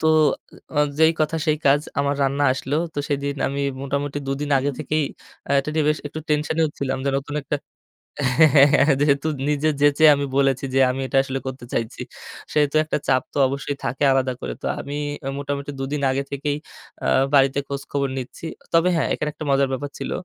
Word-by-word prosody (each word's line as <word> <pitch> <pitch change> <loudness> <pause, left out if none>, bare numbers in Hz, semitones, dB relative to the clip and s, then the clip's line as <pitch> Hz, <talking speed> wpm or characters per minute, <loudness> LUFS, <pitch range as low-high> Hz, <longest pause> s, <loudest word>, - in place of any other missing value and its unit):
তো 160 - +1 0.7
আ - - 0 0.2
যেই 160 0 +6
কথা 155 +1 +1
সেই 155 -1 +3
কাজ 140 +1 +5 0.2
আমার 140 0 +1
রান্না 140 +1 +1
আসলো। 130 +2 -3 0.2
তো - - -3
সেদিন 140 0 -1
আমি 140 +1 -2 0.2
মোটামুটি 140 +1 -2
২ 135 - 0
দিন 145 0 -3
আগে 140 +2 0
থেকেই 155 0 0 0.4
আ - - -8
এটা 140 +2 -2 0.2
বেশ 150 0 +2
একটু 155 +2 -6
টেনশনেও 155 +1 +1
ছিলাম 135 -1 -1
যে 140 - +1
নতুন 145 +1 -7
একটা 145 +2 -2 0.8
হ্যাঁ, 160 -1 +7
হ্যাঁ, 140 0 +8 0.2
হ্যাঁ, 150 - +4
যেহেতু 145 +1 +2 0.2
নিজে 150 +1 +1
যেচে 145 +1 +4
আমি 140 0 -2
বলেছি 135 -1 +2
যে - - +4
আমি 130 - -5
এটা 135 - 0
আসলে 135 0 -3
করতে 130 -2 -6
চাইছি। 115 -1 -3 0.5
সেহেতু 150 -1 +2
একটা 155 - -1
চাপ 130 -1 +3
তো - - -4
অবশ্যই 140 +1 -3
থাকে 135 +4 -2
আলাদা 135 -1 +2
করে। - - -4
তো - - -6
আমি 140 - -6 0.4
মোটামুটি 140 0 -4
২ - - -2
দিন 150 -1 -2
আগে 135 +1 -1
থেকেই 145 +1 -2 0.5
আ - - -2 0.3
বাড়িতে 135 0 +4
খোঁজ 140 0 -4
খবর 140 -1 0
নিচ্ছি। 130 +4 -7 0.3
তবে 165 +2 +4
হ্যাঁ, 165 - +1
এখানে 150 - -2
একটা 155 - -7
মজার 135 0 +3
ব্যাপার 145 +2 -3
ছিল। - - -4
140 Hz, 200 wpm, -22 LUFS, 135-150 Hz, 0.8 s, হ্যাঁ